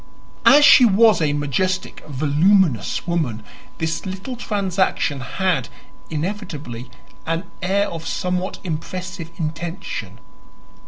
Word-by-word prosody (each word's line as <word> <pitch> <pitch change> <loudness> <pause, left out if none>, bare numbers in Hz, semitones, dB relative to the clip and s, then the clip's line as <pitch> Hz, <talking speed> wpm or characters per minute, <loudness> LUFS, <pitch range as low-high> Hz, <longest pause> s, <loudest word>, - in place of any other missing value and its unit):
As 290 +1 +8
she 275 - +8
was 220 -2 +5
a 150 -2 +2
majestic, 165 +7 -1
voluminous 150 - +2
woman, 155 -11 -1 0.3
this 160 0 -2
little 195 +7 -5
transaction 190 - 0
had, 170 +1 -1 0.4
inevitably, 150 - -5 0.4
an 165 +2 -1 0.2
air 200 +2 +1
of 165 -1 -6
somewhat 180 +1 -2
impressive 180 +1 -5
intention. 170 - -5
180 Hz, 100 wpm, -21 LUFS, 150-195 Hz, 0.4 s, As